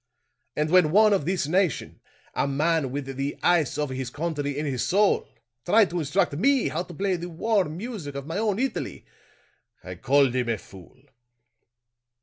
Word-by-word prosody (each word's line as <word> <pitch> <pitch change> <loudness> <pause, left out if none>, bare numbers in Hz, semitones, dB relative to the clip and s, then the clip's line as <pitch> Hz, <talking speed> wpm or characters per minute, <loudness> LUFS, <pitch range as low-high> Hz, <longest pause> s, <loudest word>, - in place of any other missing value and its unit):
And 155 +1 -1
when 180 -4 +5
one 210 +5 +5
of 190 -8 0
this 180 -2 0
nation 180 +1 0 0.3
a - - 0
man 150 +1 +1
with 140 0 -4
the 135 +1 -4
ice 165 -6 +2
of 150 -2 -2
his 130 -1 -4
country 145 -1 -3
in 150 - -2
his 130 -4 -2
soul 200 +2 +2 0.4
tried 210 +1 +4
to 175 - -2
instruct 165 +2 0
me 265 - +2
how - - -2
to 180 -1 -9
play 190 +1 0
the 175 +1 -6
warm 175 -2 0
music 195 - -6
of 140 -1 -5
my 165 +6 -3
own 210 -3 0
Italy, 265 +3 -3 0.8
I - - -7
called 135 -1 +2
him 125 -2 -1
a 115 - 0
fool!" 95 +5 -15
160 Hz, 175 wpm, -25 LUFS, 140-190 Hz, 0.8 s, when